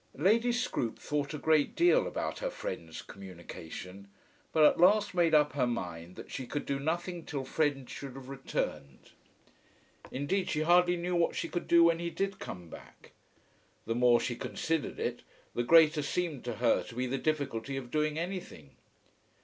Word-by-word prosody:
Lady 225 Hz, -, +3 dB
Scroope 235 Hz, -, -1 dB
thought 145 Hz, -1 st, -2 dB
a 150 Hz, -, -4 dB
great 155 Hz, 0 st, +2 dB
deal 355 Hz, +9 st, +4 dB
about -, -, -3 dB
her -, -, -2 dB
friend's 85 Hz, -, -6 dB
communication, 90 Hz, 0 st, -9 dB, 0.4 s
but 155 Hz, -, +4 dB
at 150 Hz, -, +5 dB
last 200 Hz, +3 st, +5 dB
made 170 Hz, -3 st, +3 dB
up 150 Hz, -1 st, +4 dB
her 130 Hz, -3 st, +1 dB
mind 90 Hz, -6 st, -5 dB
that -, -, -10 dB
she 130 Hz, -, -5 dB
could 145 Hz, -, -3 dB
do 140 Hz, -1 st, -1 dB
nothing 170 Hz, +3 st, -2 dB
till 140 Hz, -4 st, -4 dB
Fred 140 Hz, -2 st, 0 dB
should 135 Hz, -2 st, -8 dB
have 135 Hz, -1 st, -9 dB
returned. 125 Hz, -, -4 dB, 1.0 s
Indeed 145 Hz, +9 st, -1 dB
she 155 Hz, -, 0 dB
hardly 175 Hz, +2 st, +4 dB
knew 175 Hz, +1 st, -2 dB
what 170 Hz, -1 st, +2 dB
she -, -, -2 dB
could 175 Hz, -, -4 dB
do 170 Hz, 0 st, +6 dB
when 170 Hz, 0 st, +4 dB
he 170 Hz, 0 st, -2 dB
did 195 Hz, +3 st, -3 dB
come 90 Hz, -2 st, -7 dB
back. -, -, -14 dB, 0.7 s
The 115 Hz, -, -1 dB
more 120 Hz, 0 st, +5 dB
she 120 Hz, -, -2 dB
considered 160 Hz, +5 st, -2 dB
it -, -, -2 dB, 0.3 s
the -, -, 0 dB
greater 155 Hz, +3 st, +6 dB
seemed 150 Hz, -1 st, -2 dB
to 120 Hz, -2 st, -3 dB
her 115 Hz, +1 st, +3 dB
to -, -, -11 dB
be 125 Hz, +1 st, -1 dB
the 130 Hz, +2 st, -2 dB
difficulty 140 Hz, -4 st, -2 dB
of 125 Hz, -2 st, -7 dB
doing 155 Hz, 0 st, 0 dB
anything. 170 Hz, -, -6 dB
150 Hz, 175 wpm, -31 LUFS, 120-170 Hz, 1.0 s, do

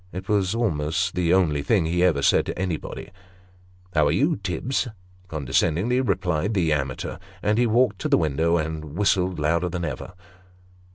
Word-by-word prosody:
It 95 Hz, +1 st, -7 dB
was 100 Hz, -1 st, +1 dB
almost 85 Hz, -5 st, 0 dB
the 90 Hz, -2 st, +1 dB
only 85 Hz, -6 st, +3 dB
thing 95 Hz, +2 st, +2 dB
he 85 Hz, +2 st, +1 dB
ever 80 Hz, -6 st, +2 dB
said -, -, +3 dB
to -, -, -4 dB
anybody. 90 Hz, -1 st, -4 dB, 0.4 s
" 90 Hz, 0 st, -30 dB
How 75 Hz, -3 st, +3 dB
are -, -, +2 dB
you, 155 Hz, +4 st, +2 dB
Tibbs? 100 Hz, +9 st, -2 dB, 0.2 s
'' 90 Hz, 0 st, -29 dB
condescendingly 85 Hz, -, 0 dB
replied 95 Hz, -3 st, 0 dB
the 85 Hz, -5 st, +2 dB
amateur; 70 Hz, 0 st, -3 dB, 0.2 s
and 105 Hz, +2 st, +2 dB
he 120 Hz, -, +3 dB
walked 115 Hz, -3 st, +2 dB
to -, -, -2 dB
the -, -, +5 dB
window, 80 Hz, +2 st, +1 dB
and 80 Hz, -1 st, -4 dB
whistled 95 Hz, -3 st, +1 dB
louder 85 Hz, +4 st, +1 dB
than 85 Hz, 0 st, -3 dB
ever. 75 Hz, +5 st, -6 dB
90 Hz, 175 wpm, -24 LUFS, 80-95 Hz, 0.4 s, the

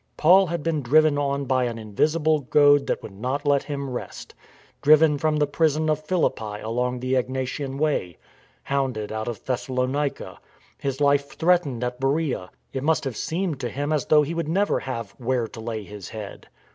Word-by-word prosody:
Paul 185 Hz, +4 st, +6 dB
had 170 Hz, -2 st, -3 dB
been 160 Hz, -3 st, 0 dB
driven 150 Hz, +3 st, +4 dB
on 140 Hz, 0 st, -1 dB
by 130 Hz, -1 st, +1 dB
an 120 Hz, -1 st, -3 dB
invisible 150 Hz, +9 st, +1 dB
goad 145 Hz, +1 st, +4 dB
that -, -, -2 dB
would -, -, -8 dB
not 130 Hz, +8 st, -3 dB
let 140 Hz, -1 st, +3 dB
him 140 Hz, -2 st, -5 dB
rest; 125 Hz, -2 st, -7 dB, 0.5 s
driven 150 Hz, 0 st, +5 dB
from 155 Hz, 0 st, +1 dB
the 150 Hz, -, +3 dB
prison 155 Hz, +1 st, +1 dB
of 155 Hz, 0 st, -2 dB
Philippi 110 Hz, -, -1 dB
along 125 Hz, +3 st, -2 dB
the 130 Hz, +1 st, -2 dB
Egnatian 130 Hz, +2 st, -2 dB
Way; 140 Hz, -, -1 dB, 0.5 s
hounded 130 Hz, -6 st, -2 dB
out 110 Hz, +1 st, -4 dB
of 120 Hz, -4 st, -6 dB
Thessalonica; 130 Hz, +2 st, -2 dB, 0.4 s
his 135 Hz, 0 st, -3 dB
life 140 Hz, 0 st, +2 dB
threatened 160 Hz, -8 st, +2 dB
at 125 Hz, 0 st, -3 dB
Beroea; 135 Hz, -, -1 dB, 0.2 s
it 135 Hz, -, -2 dB
must 160 Hz, +3 st, +1 dB
have 135 Hz, -5 st, -4 dB
seemed 165 Hz, -, -2 dB
to 125 Hz, -3 st, -3 dB
him 145 Hz, +3 st, -2 dB
as 150 Hz, -4 st, -1 dB
though 150 Hz, -1 st, +5 dB
he 150 Hz, +3 st, -3 dB
would 165 Hz, -2 st, -2 dB
never 200 Hz, +5 st, +1 dB
have 115 Hz, -6 st, -5 dB
" -, -, -30 dB
where 125 Hz, -1 st, 0 dB
to 115 Hz, -, -10 dB
lay 110 Hz, -1 st, -4 dB
his 100 Hz, -2 st, -9 dB
head." 105 Hz, -2 st, -8 dB
140 Hz, 185 wpm, -24 LUFS, 125-155 Hz, 0.5 s, Paul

